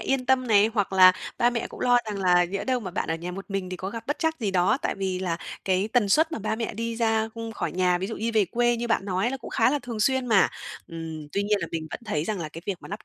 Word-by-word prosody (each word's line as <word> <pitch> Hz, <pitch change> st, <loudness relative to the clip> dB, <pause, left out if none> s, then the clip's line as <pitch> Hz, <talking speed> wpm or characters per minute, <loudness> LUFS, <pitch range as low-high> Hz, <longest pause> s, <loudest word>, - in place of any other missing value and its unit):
yên 265 Hz, -2 st, -1 dB
tâm 260 Hz, -1 st, +3 dB
này, 210 Hz, -1 st, +5 dB
hoặc 200 Hz, -3 st, 0 dB
là 185 Hz, -1 st, +8 dB, 0.3 s
ba 240 Hz, -, +4 dB
mẹ 235 Hz, -2 st, -2 dB
cũng -, -, -11 dB
lo 245 Hz, 0 st, +4 dB
rằng 205 Hz, -2 st, -4 dB
là 180 Hz, -1 st, +4 dB
nhỡ 195 Hz, +3 st, -4 dB
đâu 255 Hz, -2 st, 0 dB
mà 185 Hz, -4 st, -6 dB
bạn -, -, -3 dB
ở 160 Hz, -, +1 dB
nhà 170 Hz, +2 st, -5 dB
một 195 Hz, +2 st, -7 dB
mình 195 Hz, -2 st, -3 dB
thì 185 Hz, -, -4 dB
có 190 Hz, +2 st, -5 dB
gặp 230 Hz, 0 st, -7 dB
bất 290 Hz, -, -2 dB
trắc 320 Hz, -1 st, 0 dB
gì 210 Hz, -, 0 dB
đó. 185 Hz, +7 st, +2 dB
Tại -, -, -1 dB
vì 190 Hz, -2 st, -2 dB
là 175 Hz, -3 st, -1 dB, 0.3 s
cái 190 Hz, +2 st, +1 dB
tần 230 Hz, -5 st, +3 dB
suất 320 Hz, +9 st, +3 dB
mà -, -, -2 dB
ba 220 Hz, +1 st, -2 dB
mẹ 225 Hz, -2 st, -3 dB
đi 230 Hz, +1 st, -3 dB
ra, 225 Hz, -1 st, +1 dB
ưm, 230 Hz, -1 st, -6 dB
khỏi -, -, -3 dB
nhà, 180 Hz, -1 st, +2 dB
ví 190 Hz, -, -3 dB
dụ 225 Hz, -, -5 dB
như 230 Hz, +2 st, -1 dB
về 210 Hz, -2 st, +4 dB
quê 240 Hz, +5 st, +1 dB
như 240 Hz, +1 st, -3 dB
bạn 210 Hz, -, +1 dB
nói 190 Hz, -1 st, -1 dB
á, 245 Hz, -, +1 dB
là 270 Hz, -, -3 dB
cũng 240 Hz, -, -10 dB
khá 230 Hz, +2 st, +3 dB
là 295 Hz, -, +1 dB
thường 240 Hz, -4 st, -6 dB
xuyên 260 Hz, +3 st, +2 dB
mà. 210 Hz, -5 st, +5 dB, 0.4 s
Ừm, 160 Hz, -2 st, -7 dB
tuy 200 Hz, -, 0 dB
nhiên 205 Hz, 0 st, +1 dB
là 165 Hz, -, -2 dB
mình 160 Hz, -1 st, -4 dB
vẫn -, -, -6 dB
thấy 160 Hz, -8 st, -1 dB
rằng 205 Hz, -3 st, -3 dB
là 155 Hz, -, -4 dB
cái 165 Hz, +2 st, -10 dB
việc 195 Hz, -3 st, -1 dB
mà -, -, -10 dB
lắp 210 Hz, +3 st, -7 dB
205 Hz, 315 wpm, -26 LUFS, 185-235 Hz, 0.4 s, là